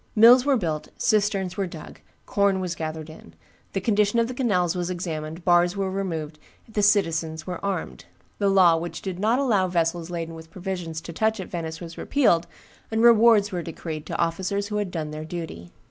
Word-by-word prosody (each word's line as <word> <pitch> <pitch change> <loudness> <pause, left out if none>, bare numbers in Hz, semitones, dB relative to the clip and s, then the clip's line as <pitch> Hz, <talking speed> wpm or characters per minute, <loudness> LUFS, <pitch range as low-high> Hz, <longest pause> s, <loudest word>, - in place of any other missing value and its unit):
Mills 245 +4 +7
were 275 -2 +4
built, 160 -7 -3
cisterns 200 -4 +1
were 195 -2 0
dug, 160 -3 -10 0.3
corn 200 -5 +2
was 180 -2 -2
gathered 155 -2 -5
in, 155 - -14 0.4
the 195 - 0
condition 210 +2 +2
of 230 0 +3
the 255 - -5
canals 185 -9 +1
was 180 0 -2
examined, 165 -2 -5
bars 175 +1 +4
were 195 -1 -1
removed, 165 -6 -4 0.3
the 220 -2 -1
citizens 165 -6 +1
were 180 -2 -6
armed; 180 - -3 0.3
the 200 -1 +2
law 185 -4 +6
which 165 0 -5
did 185 -2 -4
not 220 +5 +2
allow 220 -9 +2
vessels 170 -1 -1
laden 165 -1 -4
with 160 0 -11
provisions 175 -4 -5
to 170 - -8
touch 220 +4 0
at 190 - -6
Venice 165 -2 -4
was 170 -1 -9
repealed, 175 -12 +2 0.4
and 225 +1 0
rewards 225 -3 +6
were 180 -2 -2
decreed 160 -2 -6
to - - -3
officers 190 +4 -1
who 210 - -2
had 205 -2 -1
done 160 -4 -4
their 155 0 -6
duty. 160 - -7
180 Hz, 190 wpm, -25 LUFS, 165-205 Hz, 0.4 s, Mills